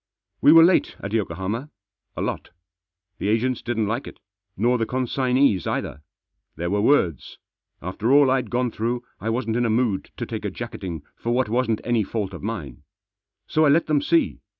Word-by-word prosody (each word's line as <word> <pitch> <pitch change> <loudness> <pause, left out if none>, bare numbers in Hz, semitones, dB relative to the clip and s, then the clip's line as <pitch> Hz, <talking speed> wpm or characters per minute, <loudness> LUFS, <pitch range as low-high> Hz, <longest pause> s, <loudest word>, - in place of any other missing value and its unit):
We - - +7
were 165 0 +9
late 175 +2 +3
at 100 +2 -5
Yokohama. 105 - -2 0.5
A - - -1
lot. - - -4 0.7
The - - -2
agents 115 +3 +1
didn't 115 -2 -1
like 115 +6 -2
it, - - -11 0.4
nor 120 +4 +2
the 115 - 0
consignees 130 -5 +1
either. 75 - -3 0.5
There 85 +3 -3
were 100 0 +1
words. 95 - +1 0.5
After 100 +7 -1
all 140 -1 +6
I'd 130 -4 0
gone 125 0 0
through 120 +3 -2 0.2
I 110 - -3
wasn't 115 -1 -1
in 120 - +1
a 115 - +1
mood 110 -3 0
to - - -3
take - - -5
a - - -1
jacketing 85 -5 -6
for 120 - -3
what 130 -3 +1
wasn't 115 -1 0
any 120 -3 +1
fault 100 -1 -3
of 90 - -8
mine. 95 - -5 0.6
So 155 - +2
I 150 - +5
let 160 +4 +4
them 150 -2 +2
see. 165 +3 +1
115 Hz, 185 wpm, -23 LUFS, 105-130 Hz, 0.7 s, were